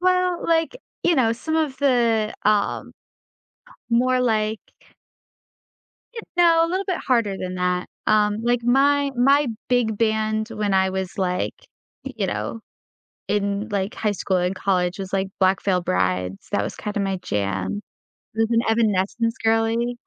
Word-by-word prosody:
Well, 365 -1 +1
like, 330 +8 +1 0.3
you 345 - +3
know, 230 -5 +3
some 315 +7 -3
of 300 -4 0
the, 235 -6 +2
um, 210 -1 +1 1.0
more, 255 +2 +3
like 220 -2 0 1.5
you 455 - -6 0.2
know, 330 -1 +5
a - - -4
little 375 +3 -2
bit 370 -3 -1
harder 225 -6 +2
than 185 0 -5
that, 180 0 -1 0.2
um, 210 -1 +3
like, 240 0 +1
my 280 +3 +3
my 275 +3 +4 0.2
big 240 -4 +1
band 220 -1 0
when 210 -3 -1
I 190 0 +3
was, 190 0 -4
like, 180 -1 -1 0.5
you - - -3
know, 225 - -4 0.7
in, 205 +1 -1
like, 200 0 -2
high 210 -1 0
school 190 -1 -1
and 180 +2 0
college 185 -1 0
was, 190 0 -6
like, 190 0 0
Black 190 0 +3
Veil 185 -3 +1
Brides. 90 - -1
That 100 - +1
was 105 - -5
kinda 210 0 -4
my 195 -1 -1
jam. 100 -1 -2 0.6
I - - -5
was 225 +1 +2
an 230 0 +3
Evanescence 225 +1 +1
girly 225 +2 +1
220 Hz, 155 wpm, -23 LUFS, 190-245 Hz, 1.5 s, know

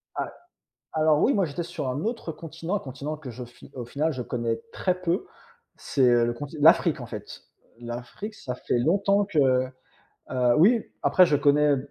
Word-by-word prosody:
Ah! - - -2 0.6
Alors 155 -1 +3
oui, 280 - +4
moi 195 -3 +2
j'étais 160 +2 -4
sur 170 -6 -4
un 135 +5 -3
autre 225 -7 -3
continent, 165 +3 -5
un - - 0
continent 140 +2 -6
que 145 -4 -9
je 125 +1 -7
fi 120 0 -15
au 125 -2 -5
final, 145 +7 -1
je 130 - -4
connais 115 -2 -2
très 185 -1 0
peu, 180 +1 -1 0.5
c'est, 140 - -3
heu, 120 -1 +4
le 120 - -1
conti 145 +5 -8
l'Afrique 160 0 +5
en - - -6
fait. 105 -3 -9 0.4
L'Afrique, 120 - -7
ça 125 -11 -6
fait 125 - -1
longtemps 200 +8 +2
que, 190 -5 -5 0.9
heu 125 -1 +3
oui, 220 +7 +5 0.2
après 185 -2 +5
je 150 - +3
connais 145 0 +4
150 Hz, 185 wpm, -26 LUFS, 125-175 Hz, 0.9 s, l'Afrique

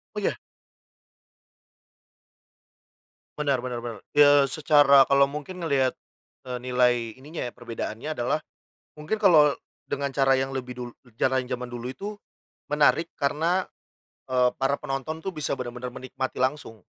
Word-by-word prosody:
Oh, - - -1
iya? - - -1 3.0
Bener 140 -4 +1
bener 125 -1 -4
bener. 110 -4 -6 0.2
Ya 145 -2 +7
secara 145 -2 +6
kalo 140 0 +4
mungkin 150 +5 -7
ngelihat, 135 -5 +1 0.5
eee, 125 -1 -5
nilai 125 -2 +1
ininya 155 0 -6
ya, 120 - -6
perbedaannya 120 +4 -5
adalah 125 +6 0 0.6
mungkin 150 +8 -1
kalo 160 -9 +5 0.3
dengan 140 0 -2
cara 135 -1 +3
yang 135 +1 -1
lebih 125 -2 -5
dul 125 -1 -6 0.3
cara 130 +2 +2
yang 125 - -5
zaman 125 0 -8
dulu 120 0 -5
itu 205 +10 -6 0.5
menarik 150 +3 +3
karena, 165 +6 +1 0.6
eee, 125 -1 +3
para 135 +1 0
penonton 135 +4 -4
tuh 190 - -3
bisa 155 -5 -3
bener-bener 125 -1 -5
menikmati 130 0 -5
langsung 130 -6 -2
135 Hz, 135 wpm, -26 LUFS, 125-150 Hz, 3.0 s, Ya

